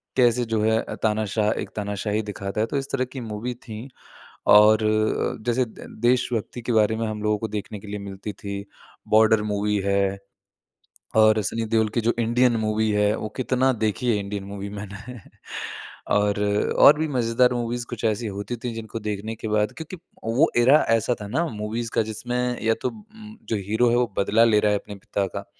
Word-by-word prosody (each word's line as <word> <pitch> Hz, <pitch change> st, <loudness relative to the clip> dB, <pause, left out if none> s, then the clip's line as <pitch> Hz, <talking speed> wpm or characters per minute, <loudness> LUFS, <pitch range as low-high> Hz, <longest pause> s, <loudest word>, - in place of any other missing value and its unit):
कैसे 120 Hz, -1 st, +3 dB
जो 105 Hz, -, +1 dB
है 110 Hz, +1 st, +3 dB
अ, -, -, -6 dB
तानाशाह 105 Hz, -1 st, +1 dB
एक -, -, -6 dB
तानाशाही 105 Hz, +1 st, -2 dB
दिखाता 100 Hz, +2 st, -3 dB
है, 110 Hz, -, +1 dB
तो 140 Hz, -, -2 dB
इस 135 Hz, 0 st, -4 dB
तरह 130 Hz, -1 st, 0 dB
की 130 Hz, -, -4 dB
मूवी 115 Hz, +4 st, -3 dB
थी। 110 Hz, +3 st, -7 dB, 0.7 s
और 105 Hz, +1 st, +8 dB, 0.7 s
जैसे 120 Hz, +1 st, +2 dB
दे 110 Hz, -, -12 dB, 0.2 s
देश 120 Hz, +1 st, +3 dB
भक्ति 115 Hz, +2 st, -3 dB
के 120 Hz, -, -3 dB
बारे 110 Hz, 0 st, +3 dB
में 115 Hz, 0 st, -1 dB
हम 105 Hz, -1 st, -4 dB
लोगों 105 Hz, 0 st, +2 dB
को 110 Hz, -, -3 dB
देखने 105 Hz, 0 st, -5 dB
के 100 Hz, -, -13 dB
लिए 105 Hz, 0 st, -5 dB
मिलती 100 Hz, +1 st, -7 dB
थी, 100 Hz, 0 st, -6 dB, 0.4 s
बॉर्डर 110 Hz, 0 st, +5 dB
मूवी 105 Hz, +1 st, 0 dB
है 100 Hz, 0 st, +1 dB, 1.0 s
और 110 Hz, 0 st, +5 dB
सनी 115 Hz, +4 st, -2 dB
देओल 110 Hz, 0 st, +2 dB
की 120 Hz, -, +2 dB
जो 115 Hz, +2 st, +2 dB
इंडियन 120 Hz, +1 st, +3 dB
मूवी 110 Hz, 0 st, 0 dB
है, 105 Hz, 0 st, +2 dB
वो 110 Hz, -, -5 dB
कितना 130 Hz, +1 st, +2 dB
देखी 110 Hz, +1 st, -1 dB
है -, -, +2 dB
इंडियन 100 Hz, 0 st, -4 dB
मूवी 100 Hz, 0 st, -6 dB
मैंने। 105 Hz, +4 st, -8 dB, 1.0 s
और 105 Hz, 0 st, +2 dB, 0.5 s
और 150 Hz, -, +9 dB
भी 160 Hz, -, 0 dB
मजेदार 125 Hz, -1 st, +2 dB
मूवीज़ 120 Hz, 0 st, -2 dB
कुछ -, -, -6 dB
ऐसी 110 Hz, +1 st, 0 dB
होती 100 Hz, +4 st, -4 dB
थी, 120 Hz, +1 st, -5 dB
जिनको 115 Hz, 0 st, -6 dB
देखने 105 Hz, +1 st, -4 dB
के 110 Hz, -, -6 dB
बाद 105 Hz, 0 st, +1 dB
क्योंकि 160 Hz, +3 st, -7 dB, 0.3 s
वो 120 Hz, +9 st, +3 dB
एरा 130 Hz, +6 st, +6 dB
ऐसा 115 Hz, +1 st, +2 dB
था 105 Hz, -, -5 dB
ना, 160 Hz, +11 st, 0 dB
मूवीज़ 115 Hz, 0 st, -4 dB
का, -, -, +4 dB
जिसमें 125 Hz, +3 st, -3 dB
या 115 Hz, 0 st, +3 dB
तो 125 Hz, -, 0 dB
उम 215 Hz, -, -13 dB
जो 110 Hz, -, +1 dB
हीरो 110 Hz, +3 st, +3 dB
है -, -, +3 dB
वो 125 Hz, 0 st, +2 dB
बदला 110 Hz, +3 st, +4 dB
ले 110 Hz, -2 st, +4 dB
रहा 105 Hz, 0 st, +2 dB
है 105 Hz, -, +2 dB
अपने 105 Hz, -, -10 dB
पिता 100 Hz, -1 st, -2 dB
का, 90 Hz, -, -6 dB
110 Hz, 200 wpm, -24 LUFS, 105-120 Hz, 1.0 s, और